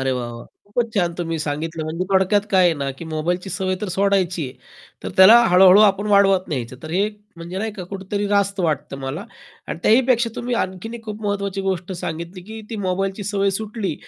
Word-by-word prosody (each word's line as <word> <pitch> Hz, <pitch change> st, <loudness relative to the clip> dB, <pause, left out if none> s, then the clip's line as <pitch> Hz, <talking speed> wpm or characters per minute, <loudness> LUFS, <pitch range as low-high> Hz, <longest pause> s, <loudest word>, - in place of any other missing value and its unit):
अरे 135 Hz, 0 st, 0 dB
वाह, 120 Hz, -2 st, -3 dB
वाह! 115 Hz, -, -9 dB, 0.2 s
खूपच 230 Hz, +2 st, -2 dB
छान 175 Hz, -4 st, +1 dB
तुम्ही 165 Hz, -2 st, -2 dB
सांगितलं. 155 Hz, +2 st, -3 dB
म्हणजे 165 Hz, +4 st, -3 dB
थोडक्यात 190 Hz, +2 st, +3 dB
काय 185 Hz, -2 st, +5 dB
आहे 170 Hz, -2 st, +4 dB
ना? 140 Hz, -1 st, -3 dB
की 150 Hz, +5 st, -10 dB
मोबाईलची 175 Hz, +4 st, -2 dB
सवय 185 Hz, 0 st, -1 dB
तर 210 Hz, -, -3 dB
सोडायची 190 Hz, -4 st, +1 dB
आहे, -, -, -11 dB, 0.5 s
तर -, -, -4 dB
त्याला 190 Hz, +5 st, +9 dB
हळू-हळू 185 Hz, +2 st, +7 dB
आपण 200 Hz, +2 st, -2 dB
वाढवत 195 Hz, -2 st, +4 dB
न्यायचं, 125 Hz, -3 st, -4 dB
तर 155 Hz, -, -7 dB
हे 195 Hz, +5 st, +1 dB, 0.3 s
म्हणजे 170 Hz, +3 st, -6 dB
नाही 220 Hz, +1 st, -3 dB
का, 190 Hz, -4 st, -7 dB
कुठेतरी 200 Hz, +1 st, -3 dB
रास्त 200 Hz, -1 st, +1 dB
वाटतं 150 Hz, -4 st, -1 dB
मला. 135 Hz, +9 st, -5 dB, 0.4 s
आणि -, -, -4 dB
त्याहीपेक्षा 240 Hz, 0 st, +3 dB
तुम्ही 245 Hz, 0 st, -2 dB
आणखीन 185 Hz, +5 st, -6 dB
एक 225 Hz, -1 st, -9 dB
खूप 215 Hz, 0 st, -7 dB
महत्त्वाची 200 Hz, -1 st, -2 dB
गोष्ट 190 Hz, -1 st, -2 dB
सांगितली, 170 Hz, +1 st, -6 dB
की 220 Hz, +3 st, -9 dB
ती 225 Hz, -, -4 dB
मोबाईलची 195 Hz, +2 st, -2 dB
सवय 200 Hz, -1 st, +1 dB
सुटली, 210 Hz, -6 st, -3 dB
190 Hz, 200 wpm, -21 LUFS, 165-205 Hz, 0.5 s, त्याला